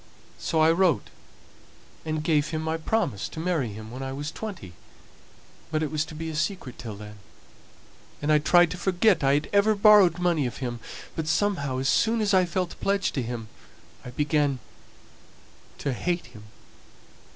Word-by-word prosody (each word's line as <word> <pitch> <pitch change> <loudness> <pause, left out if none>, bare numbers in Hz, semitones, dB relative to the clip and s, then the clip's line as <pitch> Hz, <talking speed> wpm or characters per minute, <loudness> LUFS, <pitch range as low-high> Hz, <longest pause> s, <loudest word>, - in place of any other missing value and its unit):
So 160 - 0
I 160 +1 +6
wrote 175 -2 +2 0.9
and 155 -1 -2
gave 155 -2 +2
him 155 0 -3
my 160 0 -1
promise 165 - -1
to - - -8
marry 160 -9 -1
him 110 +2 -9
when 130 +2 -7
I 135 0 -4
was 145 +2 -4
twenty, 190 - -7 1.0
but 155 0 0
it 150 - -2
was 155 0 0
to 155 - -10
be 165 +1 -5
a - - -6
secret 160 - -3
till 110 -4 -6
then. 105 0 -11 1.0
And 150 +1 0
I 150 - +5
tried 175 +2 +4
to 180 - -6
forget 185 -2 +2
I 135 +1 +4
had 150 - -1
ever 205 +2 +4
borrowed 200 -4 +6
money 170 -6 +1
of 120 - -7
him, 120 -2 -4 0.4
but 160 -1 -3
somehow 160 -8 0
as 130 +1 -1
soon 225 +9 +2
as 210 -2 +1
I 185 -1 +5
felt 180 0 -3
pledged 200 0 +1
to 135 - -1
him 115 -2 -5 0.6
I - - -8
began 145 +1 +1 1.2
to 140 - -2
hate 175 +7 -2
him. 110 -3 -14
155 Hz, 175 wpm, -26 LUFS, 135-180 Hz, 1.2 s, I